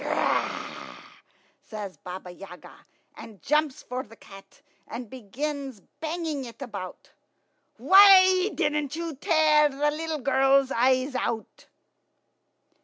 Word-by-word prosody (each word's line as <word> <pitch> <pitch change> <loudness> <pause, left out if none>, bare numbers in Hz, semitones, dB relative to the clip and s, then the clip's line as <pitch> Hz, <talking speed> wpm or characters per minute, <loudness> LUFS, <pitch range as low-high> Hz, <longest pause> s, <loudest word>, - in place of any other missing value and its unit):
"Grr," - - -3 0.6
says 205 -4 -8
Baba 180 0 -9
Yaga, 180 0 -13 0.4
and 215 -4 -12
jumps 300 - -1
for 250 +1 -5
the 225 -3 -15
cat, 195 -3 -16 0.2
and 240 0 -7
begins 265 +2 -6 0.2
banging 320 -3 -4
it 235 - -12
about. 200 -9 -8 0.7
"Why 375 -1 +6
didn't 300 -3 -1
you 335 -1 -5
tear 305 +1 +3
the 290 +2 -1
little 320 +1 -4
girl's 270 +1 +2
eyes 255 +3 +1
out?" 235 -3 -4
270 Hz, 110 wpm, -26 LUFS, 230-310 Hz, 0.7 s, Why